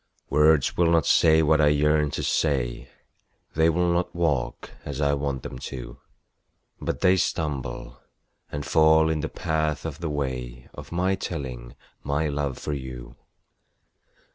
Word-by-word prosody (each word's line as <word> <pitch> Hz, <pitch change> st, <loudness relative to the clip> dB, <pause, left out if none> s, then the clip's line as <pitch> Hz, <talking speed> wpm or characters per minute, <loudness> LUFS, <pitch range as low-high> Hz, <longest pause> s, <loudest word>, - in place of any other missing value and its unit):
Words 75 Hz, -1 st, +4 dB
will 85 Hz, -1 st, +4 dB
not 85 Hz, -2 st, +3 dB
say 80 Hz, -1 st, +5 dB
what 80 Hz, 0 st, +3 dB
I 75 Hz, -, +5 dB
yearn 75 Hz, 0 st, +3 dB
to -, -, -3 dB
say 65 Hz, -6 st, -1 dB, 0.7 s
They 80 Hz, +1 st, +4 dB
will 85 Hz, +1 st, +1 dB
not 90 Hz, 0 st, -1 dB
walk 75 Hz, -7 st, -1 dB
as 70 Hz, -1 st, -6 dB
I 70 Hz, -1 st, +2 dB
want 70 Hz, -2 st, -2 dB
them 65 Hz, -, -7 dB
to, 65 Hz, -1 st, -8 dB, 0.8 s
But -, -, -3 dB
they 90 Hz, 0 st, +5 dB
stumble 70 Hz, -9 st, -3 dB, 0.5 s
and 75 Hz, -1 st, -4 dB
fall 80 Hz, 0 st, +4 dB
in 80 Hz, -, -1 dB
the 80 Hz, -, -3 dB
path 80 Hz, -3 st, -2 dB
of 80 Hz, -1 st, -5 dB
the 85 Hz, -2 st, -3 dB
way 65 Hz, -4 st, -4 dB
Of -, -, -10 dB
my 90 Hz, +3 st, +1 dB
telling 65 Hz, -9 st, -5 dB, 0.3 s
my 70 Hz, +3 st, 0 dB
love 70 Hz, -2 st, -2 dB
for 75 Hz, -, -4 dB
you. 65 Hz, -3 st, -7 dB
75 Hz, 150 wpm, -25 LUFS, 70-80 Hz, 0.8 s, say